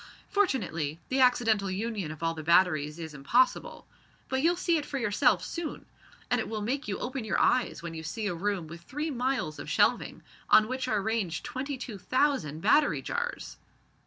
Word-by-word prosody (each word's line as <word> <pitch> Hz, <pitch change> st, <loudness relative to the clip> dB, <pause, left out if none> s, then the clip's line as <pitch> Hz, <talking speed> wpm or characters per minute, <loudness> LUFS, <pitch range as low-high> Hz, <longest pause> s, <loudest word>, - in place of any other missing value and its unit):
Fortunately 180 Hz, -, 0 dB
the 265 Hz, -, +1 dB
accidental 225 Hz, -6 st, +3 dB
union 200 Hz, -2 st, -3 dB
of 155 Hz, +1 st, -9 dB
all 165 Hz, 0 st, +1 dB
the 160 Hz, -, -6 dB
batteries 155 Hz, -2 st, +3 dB
is 160 Hz, -2 st, -7 dB
impossible. 150 Hz, -, +1 dB, 0.4 s
But 265 Hz, 0 st, 0 dB
you'll 340 Hz, +4 st, +3 dB
see 345 Hz, -1 st, +1 dB
it 295 Hz, -, -3 dB
for 275 Hz, -, -3 dB
yourself 210 Hz, -5 st, +2 dB
soon. 335 Hz, -3 st, -5 dB, 0.5 s
And -, -, +3 dB
it -, -, -5 dB
will 215 Hz, -2 st, -3 dB
make 265 Hz, +5 st, -2 dB
you 195 Hz, -, -2 dB
open 255 Hz, 0 st, -4 dB
your 220 Hz, -, 0 dB
eyes 250 Hz, -8 st, +2 dB
when 170 Hz, -1 st, -5 dB
you 160 Hz, -, -6 dB
see 210 Hz, +8 st, -4 dB
a 200 Hz, -, 0 dB
room 190 Hz, 0 st, -2 dB
with 170 Hz, +2 st, -10 dB
three 295 Hz, -, -4 dB
miles 250 Hz, -, -1 dB
of -, -, -7 dB
shelving, -, -, +1 dB, 0.3 s
on 215 Hz, -, +6 dB
which 255 Hz, +1 st, -3 dB
are 215 Hz, -5 st, 0 dB
ranged 205 Hz, -7 st, -1 dB
twenty 275 Hz, +1 st, -4 dB
two 230 Hz, -5 st, -7 dB
thousand 255 Hz, -, 0 dB
battery 295 Hz, -, +3 dB
jars." 485 Hz, +1 st, -4 dB
220 Hz, 190 wpm, -29 LUFS, 170-265 Hz, 0.5 s, on